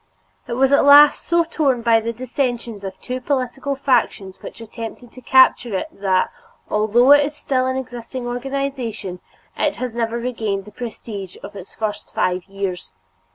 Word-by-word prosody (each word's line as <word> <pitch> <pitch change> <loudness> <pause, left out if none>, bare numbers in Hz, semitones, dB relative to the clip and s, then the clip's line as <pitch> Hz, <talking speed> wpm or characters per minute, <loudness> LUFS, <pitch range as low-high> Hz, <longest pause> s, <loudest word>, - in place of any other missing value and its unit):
It - - -4
was 265 +2 +3
at 280 - +5
last 290 +1 +7
so 340 0 +3
torn 280 -7 0
by 230 -1 +5
the 230 +1 -3
dissensions 240 -3 -3
of 190 -1 -7
two 255 0 -4
political 270 +1 -2
factions 235 -8 0
which - - -9
attempted 230 +1 -8
to 255 - -13
capture 245 -4 +4
it - - -4
that, 190 -2 0 0.4
although 220 +5 +4
it 290 0 +8
is 290 +1 -4
still 255 -1 0
an 260 0 -1
existing 245 0 -6
organization, 245 -6 -4 0.4
it - - 0
has 250 -2 -4
never 230 0 -1
regained 220 -5 -3
the 210 - -12
prestige 210 -4 -7
of - - -9
its 195 -1 -10
first 210 -1 -4
five 180 0 0
years. 195 - -5
240 Hz, 165 wpm, -20 LUFS, 210-260 Hz, 0.4 s, it